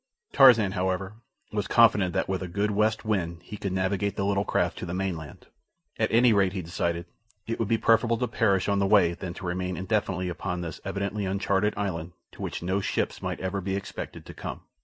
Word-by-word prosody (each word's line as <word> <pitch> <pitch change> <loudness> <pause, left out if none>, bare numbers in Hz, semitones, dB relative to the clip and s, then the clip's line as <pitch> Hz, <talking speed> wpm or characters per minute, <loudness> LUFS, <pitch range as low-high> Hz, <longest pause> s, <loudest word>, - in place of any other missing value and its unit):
Tarzan, 115 -8 +7
however, 95 +1 -1 0.4
was 105 -2 -2
confident 105 -6 +5
that - - +1
with 95 -1 -2
a 95 - -3
good 100 +4 -1
west 110 +2 +1
wind 85 -5 -1
he 105 - -8
could 100 -2 -4
navigate 95 +2 0
the 100 - -1
little 100 0 +1
craft - - 0
to - - -4
the 90 - -3
mainland. 85 -6 -4 0.5
At - - +2
any 115 +1 +5
rate, 95 -2 +3
he 95 -2 -3
decided, 85 0 -2 0.4
it 115 - -3
would 115 - 0
be 115 +1 +2
preferable 115 +1 +3
to 125 - -1
perish 100 -4 +1
on 100 -1 +2
the 100 - +2
way 95 -4 +5
than 85 0 -6
to - - -8
remain 90 +1 -2
indefinitely 95 -2 -1
upon 90 0 -3
this 80 -2 -6
evidently 100 +1 -2
uncharted 100 +2 +1
island 90 -4 -3 0.2
to - - -12
which - - -4
no 95 +3 0
ships - - -2
might - - -3
ever 95 +1 -2
be 95 +1 -2
expected 100 - -6
to - - -9
come. - - -6
95 Hz, 210 wpm, -27 LUFS, 90-105 Hz, 0.5 s, Tarzan